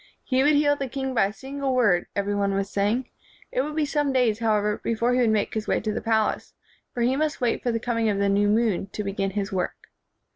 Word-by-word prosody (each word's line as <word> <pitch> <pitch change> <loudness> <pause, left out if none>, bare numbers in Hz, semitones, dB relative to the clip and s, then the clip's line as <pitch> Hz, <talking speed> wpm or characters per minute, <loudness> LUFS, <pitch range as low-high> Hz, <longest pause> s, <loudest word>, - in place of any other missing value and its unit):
He 260 -1 +1
would 295 +2 +4
heal 290 0 +3
the 275 -1 -4
king 265 +1 -3
by 230 - +3
a - - -6
single 270 +3 -3
word, 205 -9 +3
every 200 0 -1
one 200 -1 0
was 195 0 -2
saying. 210 +6 0 0.4
It - - +1
would 300 0 -4
be 310 -1 +1
some 290 -1 0
days, 245 -5 +2
however, 210 -2 +1
before 230 +2 +1
he 250 - +2
would 240 -3 +3
make 215 -2 0
his 220 -1 -3
way - - +1
to 215 0 -2
the 230 - -3
palace; 220 -1 0 0.4
for 240 - -4
he 250 +2 +2
must 305 +1 -1
wait 240 -2 0
for 245 - 0
the 230 - -1
coming 230 -1 0
of 200 - 0
the 200 0 +1
new 200 +1 +2
moon 210 -3 +1
to 210 - -3
begin 195 0 -2
his 200 +1 -3
work. 185 -2 -4
225 Hz, 250 wpm, -25 LUFS, 205-265 Hz, 0.4 s, would